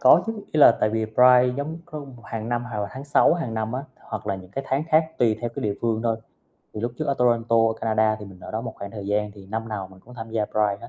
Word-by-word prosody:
có 155 Hz, +7 st, +7 dB
chứ, 225 Hz, -, -1 dB, 0.2 s
ý 155 Hz, -, 0 dB
là 120 Hz, -, +9 dB
tại 105 Hz, -, +3 dB
vì 110 Hz, 0 st, 0 dB
Pride 125 Hz, +3 st, +5 dB
giống 155 Hz, +4 st, -4 dB
có 155 Hz, -3 st, -7 dB
mục 130 Hz, -5 st, -11 dB
hàng 115 Hz, 0 st, -5 dB
năm 120 Hz, 0 st, -1 dB
hoặc 120 Hz, -4 st, -5 dB
là 100 Hz, -, -1 dB
tháng 135 Hz, +2 st, -7 dB
6 145 Hz, +3 st, +4 dB
hàng 130 Hz, -10 st, -3 dB
năm 110 Hz, +1 st, -2 dB
á, 130 Hz, -, -2 dB, 0.2 s
hoặc 110 Hz, -2 st, -7 dB
là 100 Hz, -, 0 dB
những 95 Hz, -1 st, -10 dB
cái 135 Hz, +7 st, -4 dB
tháng 135 Hz, +3 st, 0 dB
khác 160 Hz, 0 st, +5 dB
tùy 115 Hz, -3 st, +3 dB
theo 120 Hz, -1 st, -2 dB
cái -, -, -4 dB
địa 105 Hz, -2 st, 0 dB
phương 115 Hz, -1 st, 0 dB
thôi. 115 Hz, -1 st, +1 dB, 0.6 s
Thì 105 Hz, -, -4 dB
lúc 120 Hz, +1 st, -2 dB
trước -, -, -1 dB
ở 140 Hz, -, +1 dB
Toronto, 120 Hz, -1 st, +3 dB, 0.2 s
Canada 110 Hz, -1 st, +2 dB
thì -, -, -6 dB
mình 95 Hz, -2 st, -13 dB
ở -, -, -9 dB
đó 110 Hz, -, -2 dB
một 115 Hz, -1 st, -6 dB
khoảng 100 Hz, 0 st, -7 dB
thời 105 Hz, -2 st, -7 dB
gian 105 Hz, +1 st, 0 dB
thì 100 Hz, -2 st, -13 dB
năm 110 Hz, +3 st, -4 dB
nào 100 Hz, -4 st, -4 dB
mình 95 Hz, 0 st, -16 dB
cũng 125 Hz, +5 st, -15 dB
tham 115 Hz, -2 st, -7 dB
gia 110 Hz, -1 st, 0 dB
Pride 105 Hz, -1 st, +1 dB
hết, -, -, -9 dB
115 Hz, 300 wpm, -24 LUFS, 105-125 Hz, 0.6 s, là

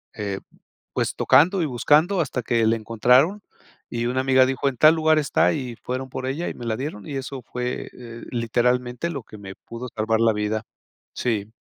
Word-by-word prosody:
eh, 100 Hz, -2 st, -3 dB, 0.5 s
pues -, -, -1 dB
tocando 180 Hz, +5 st, +4 dB
y -, -, +1 dB
buscando, 150 Hz, +9 st, +3 dB
hasta 130 Hz, -4 st, -2 dB
que 115 Hz, 0 st, +1 dB
le 115 Hz, -, +3 dB
encontraron. 125 Hz, -, +3 dB, 0.5 s
Y 120 Hz, 0 st, -2 dB
una 130 Hz, +2 st, 0 dB
amiga 130 Hz, -1 st, +5 dB
dijo: 135 Hz, +1 st, 0 dB
"En 130 Hz, -, -8 dB
tal 155 Hz, +5 st, +7 dB
lugar 160 Hz, -1 st, +3 dB
está". 145 Hz, -, +2 dB
Y 125 Hz, -6 st, -4 dB
fueron 130 Hz, +1 st, -4 dB
por 130 Hz, 0 st, -5 dB
ella 150 Hz, +6 st, -2 dB
y -, -, -7 dB
me 120 Hz, -, -8 dB
la 115 Hz, -1 st, -1 dB
dieron. 130 Hz, -7 st, -5 dB
Y 140 Hz, -, -5 dB
eso 135 Hz, -1 st, -5 dB
fue, 125 Hz, +1 st, -4 dB
eh, 115 Hz, -1 st, -10 dB
literalmente, 125 Hz, +4 st, 0 dB
lo 140 Hz, -4 st, -5 dB
que 110 Hz, -, -13 dB
me 95 Hz, -2 st, -9 dB
pudo 115 Hz, +2 st, -8 dB
salvar 110 Hz, +1 st, +1 dB
la 115 Hz, -1 st, +4 dB
vida. 105 Hz, +1 st, -2 dB, 0.5 s
Sí. 110 Hz, -3 st, -2 dB
125 Hz, 195 wpm, -23 LUFS, 115-140 Hz, 0.5 s, tal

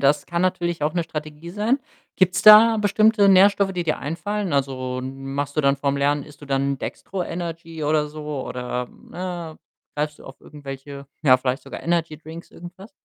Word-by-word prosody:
Das 140 Hz, +1 st, +2 dB
kann 170 Hz, 0 st, -1 dB
natürlich 175 Hz, -3 st, -1 dB
auch 150 Hz, +1 st, +1 dB
'ne 170 Hz, -2 st, -1 dB
Strategie 155 Hz, +1 st, -7 dB
sein. 215 Hz, +8 st, +1 dB, 0.4 s
Gibt's 185 Hz, 0 st, +2 dB
da 220 Hz, +2 st, +9 dB
bestimmte 210 Hz, 0 st, +4 dB
Nährstoffe, 195 Hz, +1 st, +5 dB
die 175 Hz, -2 st, -3 dB
dir 155 Hz, -, 0 dB
einfallen? 190 Hz, +5 st, -3 dB
Also, 130 Hz, -2 st, -1 dB
machst 135 Hz, +2 st, -5 dB
du -, -, +4 dB
dann 140 Hz, -1 st, +3 dB
vor'm 140 Hz, 0 st, -1 dB
Lernen 145 Hz, 0 st, +1 dB
isst 145 Hz, -1 st, -16 dB
du -, -, -10 dB
dann 140 Hz, 0 st, 0 dB
'n 135 Hz, -, -5 dB
Dextro 190 Hz, -1 st, -5 dB
Energy 165 Hz, -2 st, -5 dB
oder 150 Hz, 0 st, +1 dB
so 150 Hz, -2 st, -5 dB
oder, 125 Hz, 0 st, -4 dB
ne, 175 Hz, -3 st, -7 dB, 0.4 s
greifst 150 Hz, 0 st, -2 dB
du -, -, -15 dB
auf 135 Hz, -, -12 dB
irgendwelche, 140 Hz, -1 st, -9 dB, 0.2 s
ja, 130 Hz, -4 st, +6 dB
vielleicht 130 Hz, +2 st, -2 dB
sogar -, -, -9 dB
Energy-Drinks, 165 Hz, -1 st, -3 dB
irgendwas? 180 Hz, +5 st, -12 dB
155 Hz, 180 wpm, -23 LUFS, 140-180 Hz, 0.4 s, da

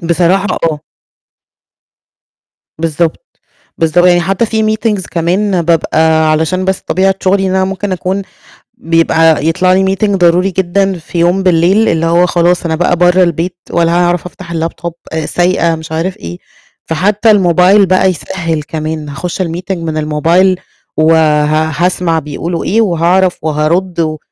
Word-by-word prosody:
بصراحة، 175 Hz, +3 st, +1 dB, 0.2 s
آه. 150 Hz, -1 st, -6 dB, 2.0 s
بالضبط، 165 Hz, -, -2 dB, 0.5 s
بالضب 165 Hz, +2 st, +2 dB
يعني 175 Hz, -1 st, +4 dB
حتى 195 Hz, +6 st, 0 dB
في 220 Hz, 0 st, -1 dB
meetings 215 Hz, -3 st, -1 dB
كمان 180 Hz, +2 st, 0 dB
بابقى 160 Hz, -1 st, +2 dB
علشان 160 Hz, +4 st, 0 dB
بس 190 Hz, 0 st, -1 dB
طبيعة 190 Hz, +2 st, 0 dB
شغلي 190 Hz, +1 st, +1 dB
إن -, -, -1 dB
أنا 190 Hz, 0 st, +2 dB
ممكن 195 Hz, +1 st, -3 dB
أكون 185 Hz, +2 st, -2 dB, 0.6 s
بيبقى 165 Hz, -4 st, +2 dB
يطلع 185 Hz, +3 st, +2 dB
لي 190 Hz, +1 st, +1 dB
meeting 205 Hz, +1 st, 0 dB
ضروري 180 Hz, +2 st, +2 dB
جدًا 190 Hz, +1 st, -1 dB
في 170 Hz, +2 st, -7 dB
يوم 175 Hz, +3 st, +2 dB
بالليل، 185 Hz, +5 st, +2 dB
اللي 165 Hz, +1 st, 0 dB
هو 170 Hz, +2 st, +3 dB
خلاص 175 Hz, 0 st, +1 dB
أنا 160 Hz, -, -1 dB
بقى 175 Hz, +1 st, +1 dB
برّه 180 Hz, +1 st, +3 dB
البيت 175 Hz, +1 st, -1 dB
ولا 170 Hz, 0 st, +1 dB
ه -, -, +2 dB
هاعرف 175 Hz, 0 st, 0 dB
أفتح 170 Hz, 0 st, -10 dB
الlaptop 165 Hz, +1 st, -3 dB, 0.2 s
آآ 160 Hz, -1 st, -2 dB
سايقة، 175 Hz, -2 st, +1 dB
مش 160 Hz, 0 st, -9 dB
عارف 170 Hz, +4 st, -2 dB
إيه. 85 Hz, +1 st, -8 dB, 0.5 s
فحتى 205 Hz, +7 st, +1 dB
الموبايل 190 Hz, +1 st, +4 dB
بقى 185 Hz, +1 st, +2 dB
يسهِّل 165 Hz, -2 st, -4 dB
كمان، 155 Hz, 0 st, -5 dB
هاخش 170 Hz, +6 st, -4 dB
الmeeting 180 Hz, +2 st, -4 dB
من 165 Hz, -2 st, -4 dB
الموبايل 165 Hz, +5 st, +1 dB, 0.4 s
وها 155 Hz, 0 st, +2 dB
هاسمع 175 Hz, -3 st, 0 dB
بيقولوا 160 Hz, +3 st, -4 dB
إيه، 225 Hz, +4 st, +1 dB
وهاعرف 180 Hz, -1 st, +1 dB
وهارُد 165 Hz, +3 st, -1 dB
و 155 Hz, -1 st, -2 dB
175 Hz, 150 wpm, -12 LUFS, 160-185 Hz, 2.0 s, يعني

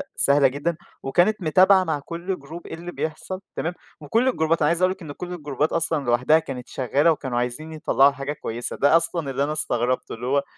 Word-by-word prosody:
سهلة 140 Hz, 0 st, +4 dB
جدًا 145 Hz, +6 st, -2 dB, 0.3 s
وكانت 180 Hz, +9 st, +2 dB
متابعة 185 Hz, +4 st, +5 dB
مع 160 Hz, -4 st, -1 dB
كُلّ 170 Hz, +5 st, -5 dB
جروب 160 Hz, +5 st, -10 dB
إيه -, -, -8 dB
اللي 175 Hz, +2 st, -8 dB
بيحصل 180 Hz, +5 st, -4 dB
تمام، 170 Hz, +2 st, -2 dB, 0.3 s
وكُلّ 225 Hz, -, +1 dB
الجروبات 160 Hz, -9 st, +1 dB
أنا 150 Hz, -, +4 dB
عايز 170 Hz, +2 st, +1 dB
أقول 185 Hz, 0 st, +4 dB
لِك 190 Hz, 0 st, -7 dB
إن 155 Hz, -, -7 dB
كُلّ 180 Hz, +5 st, -7 dB
الجروبات 150 Hz, -2 st, -2 dB
أصلًا 160 Hz, -4 st, +1 dB
لوحدها 125 Hz, +6 st, +4 dB
كانت 130 Hz, -5 st, -7 dB
شغالة 140 Hz, +6 st, +2 dB
وكانوا 130 Hz, -6 st, -3 dB
عايزين 125 Hz, +7 st, -3 dB
يطلّعوا 145 Hz, -3 st, +3 dB
حاجة 140 Hz, +1 st, -4 dB
كويسة، 120 Hz, -4 st, -5 dB
ده 145 Hz, +4 st, +5 dB
أصلًا 165 Hz, -4 st, -1 dB
اللي 140 Hz, +2 st, 0 dB
أنا 150 Hz, +1 st, -1 dB
استغربته، 125 Hz, -5 st, -1 dB
اللي 120 Hz, -, -7 dB
هو 140 Hz, +1 st, +2 dB
155 Hz, 205 wpm, -23 LUFS, 140-170 Hz, 0.3 s, متابعة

